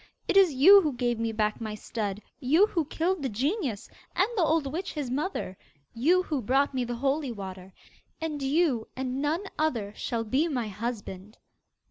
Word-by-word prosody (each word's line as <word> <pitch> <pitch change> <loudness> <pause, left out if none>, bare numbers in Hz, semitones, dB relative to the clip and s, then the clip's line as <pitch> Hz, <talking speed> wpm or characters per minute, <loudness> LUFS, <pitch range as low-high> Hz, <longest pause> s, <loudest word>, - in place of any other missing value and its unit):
It - - 0
is 385 -4 +7
you 370 +10 +8
who 305 -5 -1
gave 240 -2 -1
me 230 0 -1
back 215 0 -1
my 215 -1 -4
stud; 210 -2 -4 0.2
you 310 +8 +4
who 340 -7 -1
killed 335 +4 -1
the 270 - -1
genius, 260 - -2 0.3
and 375 - +3
the 395 - +2
old 320 -2 +2
witch 360 +4 -4
his 285 -5 -4
mother; 280 - -3 0.4
you 335 +11 +3
who 300 -7 -2
brought 270 +5 +2
me 255 -1 0
the 240 0 -3
holy 275 +2 0
water. 190 -3 -8 0.5
And 310 -3 -3
you, 275 -4 +1
and 260 +1 -3
none 310 +6 0 0.2
other, 230 -10 0
shall 230 -1 -2
be 265 +9 +1
my 245 -8 -2
husband. 210 -2 -6
265 Hz, 180 wpm, -28 LUFS, 225-315 Hz, 0.5 s, you